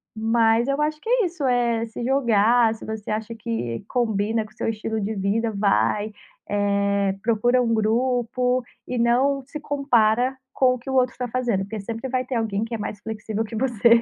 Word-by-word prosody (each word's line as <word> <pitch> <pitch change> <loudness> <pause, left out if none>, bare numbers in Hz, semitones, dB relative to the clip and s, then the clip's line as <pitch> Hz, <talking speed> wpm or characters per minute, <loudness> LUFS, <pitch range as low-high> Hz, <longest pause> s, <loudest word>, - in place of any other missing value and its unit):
Mas 225 +1 +2
eu 275 +2 0
acho 305 0 0
que - - -12
é - - +3
isso, 340 -4 -5
é 235 -2 +1
se 225 +2 -7
jogar, 235 -3 +3
se 225 - -11
você 220 -1 -5
acha 220 +2 -3
que 215 - -4
combina 220 -2 0
com 215 - -14
o - - -21
seu - - -3
estilo 220 0 -3
de 210 +2 -2
vida, 210 +4 0
vai. 205 +1 +1 0.4
Eh, 200 -1 +1
procura 240 +3 +2
um 230 -1 +1
grupo 250 +3 +1 0.2
e 250 - -3
não 260 +4 +2
se 300 +3 -7
compara 255 -4 +2 0.2
com 255 -1 +4
o 255 - -5
que 240 - -9
o - - -2
outro 255 -1 +2
tá 250 - -2
fazendo. 240 -4 0
Porque 215 +2 -6
sempre 230 +5 -5
vai 255 0 -1
ter 250 0 -4
alguém 220 -2 -1
que 230 +1 -6
é - - -1
mais 205 -1 -5
flexível 220 0 -3
que 225 +1 -7
você. 235 -1 +4
230 Hz, 200 wpm, -23 LUFS, 215-250 Hz, 0.4 s, com